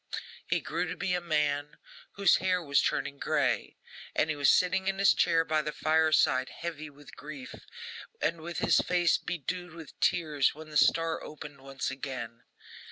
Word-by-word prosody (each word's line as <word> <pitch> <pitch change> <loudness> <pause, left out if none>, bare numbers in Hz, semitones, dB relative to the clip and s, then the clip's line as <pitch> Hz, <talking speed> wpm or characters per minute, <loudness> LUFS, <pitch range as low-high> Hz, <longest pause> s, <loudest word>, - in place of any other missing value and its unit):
He - - 0
grew - - -2
to - - -5
be 180 - -1
a 180 - 0
man, 150 -3 -1 0.4
whose 200 -2 +4
hair 185 -1 +1
was 140 -2 +3
turning 140 0 -2
grey, - - 0 0.4
and 155 - +2
he - - -2
was 145 -1 +3
sitting 185 +1 +3
in 195 0 0
his 195 0 +5
chair 165 0 +2
by 155 -1 +1
the 150 - -4
fireside, 155 -5 +2
heavy 155 -3 -6
with 145 -1 -15
grief, 145 -4 -9 0.7
and 165 0 -1
with 170 +1 -6
his - - +3
face 175 -2 +2
bedewed 175 +1 -5
with 160 -3 -12
tears, 150 -6 +2
when 155 0 -11
the - - -9
star 165 +1 +3
opened 150 -2 -10
once 135 -1 -4
again. 130 -4 -6
155 Hz, 170 wpm, -29 LUFS, 140-170 Hz, 0.7 s, his